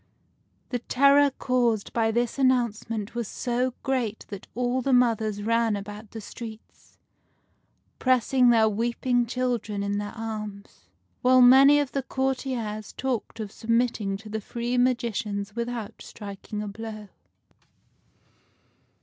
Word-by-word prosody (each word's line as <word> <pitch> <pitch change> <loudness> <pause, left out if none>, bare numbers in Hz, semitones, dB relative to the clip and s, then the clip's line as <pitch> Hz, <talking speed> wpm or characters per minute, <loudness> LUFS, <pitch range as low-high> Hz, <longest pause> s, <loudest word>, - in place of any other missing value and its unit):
The 245 - -2
terror 280 +4 +4
caused 245 -5 0
by 225 -1 +2
this 240 +3 -1
announcement 230 -4 0
was 235 -3 -3
so 250 +2 -1
great 245 -5 -1
that 200 -2 -8
all 250 +1 0
the 270 +1 +1
mothers 220 -4 +2
ran 230 0 +2
about 205 +1 -8
the 225 - -8
streets, 220 +1 -11 1.0
pressing 255 0 +3
their 225 -2 +5
weeping 240 +3 0
children 235 -5 -2
in 200 0 -1
their 205 +1 -5
arms; 210 - -7 0.3
while 255 +1 +5
many 270 +4 +8
of 285 -2 -1
the 275 - -1
courtiers 255 -6 -3
talked 245 -4 -3
of 210 -2 -5
submitting 230 -4 0
to 215 +2 -13
the 215 +1 -4
three 240 +3 -3
magicians 225 -5 0
without 235 -2 -4
striking 210 0 -7
a - - -5
blow. 215 0 -7
230 Hz, 125 wpm, -26 LUFS, 210-250 Hz, 1.0 s, many